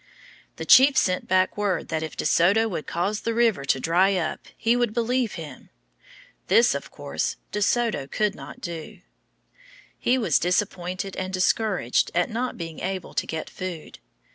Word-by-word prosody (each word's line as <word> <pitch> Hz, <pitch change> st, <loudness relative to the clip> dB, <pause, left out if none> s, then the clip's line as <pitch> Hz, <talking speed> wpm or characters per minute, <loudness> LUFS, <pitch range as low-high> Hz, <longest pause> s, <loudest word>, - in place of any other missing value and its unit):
The -, -, -6 dB
chief 270 Hz, +1 st, +7 dB
sent 185 Hz, -6 st, +1 dB
back 185 Hz, 0 st, +2 dB
word 205 Hz, -3 st, -1 dB
that 160 Hz, -, -1 dB
if 160 Hz, -, -6 dB
De -, -, -3 dB
Soto 200 Hz, +7 st, +4 dB
would 175 Hz, -7 st, -5 dB
cause 195 Hz, +5 st, -1 dB
the 230 Hz, 0 st, -2 dB
river 225 Hz, -11 st, +2 dB
to 135 Hz, -, +1 dB
dry 180 Hz, +7 st, +3 dB
up 165 Hz, -4 st, -3 dB
he 230 Hz, +1 st, +2 dB
would 240 Hz, -3 st, 0 dB
believe 240 Hz, -1 st, 0 dB
him. 160 Hz, -4 st, -9 dB, 0.8 s
This, 475 Hz, -, +5 dB
of -, -, -5 dB
course, -, -, -3 dB, 0.2 s
De 210 Hz, -, -2 dB
Soto 220 Hz, -, +1 dB
could 210 Hz, +6 st, 0 dB
not 255 Hz, -, -11 dB
do. 170 Hz, +1 st, -7 dB, 1.0 s
He 255 Hz, -, +2 dB
was 215 Hz, -, +2 dB
disappointed 185 Hz, +1 st, -1 dB
and 185 Hz, 0 st, -3 dB
discouraged 190 Hz, -, +1 dB
at 175 Hz, +4 st, +1 dB
not 245 Hz, +3 st, -3 dB
being 165 Hz, -2 st, -6 dB
able 190 Hz, -1 st, -4 dB
to -, -, -1 dB
get 160 Hz, -1 st, -4 dB
food. 185 Hz, -4 st, -7 dB
190 Hz, 165 wpm, -25 LUFS, 170-225 Hz, 1.0 s, chief